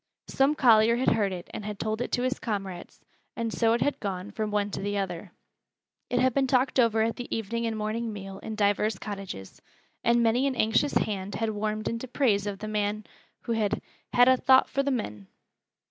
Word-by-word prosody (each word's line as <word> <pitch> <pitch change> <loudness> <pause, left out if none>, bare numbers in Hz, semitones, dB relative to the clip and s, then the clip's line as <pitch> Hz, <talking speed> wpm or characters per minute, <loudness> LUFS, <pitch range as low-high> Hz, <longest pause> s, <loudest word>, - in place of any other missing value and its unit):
Some 275 +3 +2
collier 230 -4 +5
had 255 +2 +2
heard 210 -3 +1
it 180 -2 -6
and - - -5
had 210 0 -5
told 220 +2 -2
it - - -3
to 245 - +1
his 255 0 -1
comrades, 195 -5 -5 0.4
and 230 -1 -2
so 225 -1 +3
it 235 - 0
had 285 - 0
gone 195 0 -4
from 215 0 -3
one 205 -1 0
to - - -4
the 205 +1 -2
other. 185 -1 -4 0.8
It 250 - 0
had 255 -1 +3
been 270 0 +2
talked 260 +1 +2
over 225 -2 +4
at 225 -1 -1
the 245 - -5
evening 230 +2 -2
and 220 -1 -2
morning 220 +2 -2
meal 195 -2 -8
in 220 - -6
divers 205 0 +1
cottages, 195 - -7 0.4
and 235 0 +3
many 240 +4 +3
an 270 - -1
anxious 225 +5 +2
hand 200 -1 -1
had 225 -1 -1
warmed 215 0 -2
into 230 +3 -3
praise 220 -6 +1
of 200 -1 -3
the 215 +2 -6
man 210 0 -1 0.4
who - - -4
had 220 -3 0 0.3
"had 245 0 +6
a 260 0 +6
thowt 260 +1 +5
for 275 - 0
th' 280 0 0
men." 105 - -4
220 Hz, 210 wpm, -27 LUFS, 205-240 Hz, 0.8 s, had